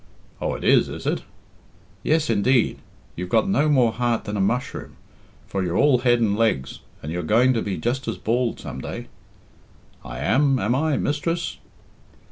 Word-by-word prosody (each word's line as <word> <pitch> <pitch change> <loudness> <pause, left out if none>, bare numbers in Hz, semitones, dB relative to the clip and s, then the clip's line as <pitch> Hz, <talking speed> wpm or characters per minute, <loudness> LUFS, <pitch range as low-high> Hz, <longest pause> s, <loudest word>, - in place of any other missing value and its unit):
"Oh, - - -1
it - - -7
is, - - +4
is - - -7
it?" - - 0 0.8
"Yes, 155 +3 +1
indeed. 115 +3 +2 0.4
You've 90 +1 -5
got 190 - +3
no 155 -6 +2
more 125 -6 +4
heart 120 -1 0
than 105 - -4
a 100 - 0
mushroom, 120 +6 -2 0.5
for 95 - -2
you're 90 0 -1
all 140 -4 +4
head 120 -1 +3
and 105 -3 +2
legs, 105 -13 0 0.2
and 75 - -4
you're 90 +1 -2
going 115 +10 +3
to 115 - 0
be 95 -3 -3
just 120 +9 -2
as 115 - -2
bald 120 +1 -1
some - - -7
day." - - -6 0.9
"I - - -7
am, 135 - +2
am 110 +1 0
I, 150 +2 +1
mistress?" 165 +4 -2
120 Hz, 175 wpm, -23 LUFS, 100-135 Hz, 0.9 s, is